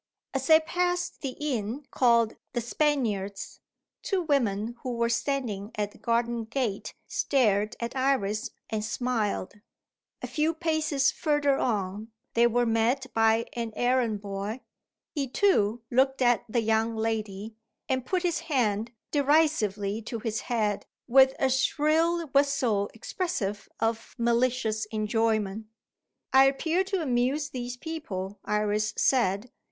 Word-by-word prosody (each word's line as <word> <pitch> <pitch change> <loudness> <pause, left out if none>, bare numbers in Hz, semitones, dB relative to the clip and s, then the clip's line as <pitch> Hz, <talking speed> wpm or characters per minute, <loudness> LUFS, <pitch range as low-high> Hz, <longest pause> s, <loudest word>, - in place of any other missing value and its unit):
As 270 -1 -2
they 315 0 +8
passed 355 +2 -1
the 270 -3 -3
inn 260 -2 -2
called 235 -3 +3 0.2
"The 240 - 0
Spaniards," 225 -7 -1 0.4
two 385 -3 -1
women 235 -7 0
who 255 -2 -3
were 235 0 +1
standing 230 -6 -2
at 210 -1 -2
the - - -18
garden 235 0 0
gate 225 -4 -3
stared 215 -6 +1
at 235 +2 -4
Iris, 255 -6 0 0.2
and 215 -1 -1
smiled. 215 -4 -2 0.6
A - - 0
few 320 +1 0
paces 315 -4 +1
further 295 -3 +1
on, 210 -1 -2 0.2
they 235 +1 +5
were 240 +1 +2
met 240 +4 +1
by 225 0 +3
an 230 -2 -4
errand 245 -4 +1
boy. 200 +4 -4 0.5
He 285 -4 -1
too 240 - +2
looked 265 +1 +3
at 240 -1 +3
the 235 +1 +1
young 220 +1 +1
lady, 220 -1 -3 0.3
and 260 -1 0
put 365 +7 -1
his 345 -2 +1
hand 235 -9 0 0.2
derisively 265 -9 +2
to 230 +1 -5
his 225 0 -2
head, 215 -4 -1 0.2
with 265 +1 +6
a 270 - +2
shrill 320 +5 +2
whistle 265 -8 +2
expressive 225 - -3
of 225 0 -2
malicious 235 -2 +1
enjoyment. 215 -1 -1 0.7
"I 265 0 +8
appear 320 +7 +1
to 385 -3 -1
amuse 265 +3 0
these 245 -1 -5
people," 205 - -5
Iris 210 +1 0
said. 230 -3 +2
235 Hz, 130 wpm, -27 LUFS, 215-275 Hz, 0.7 s, they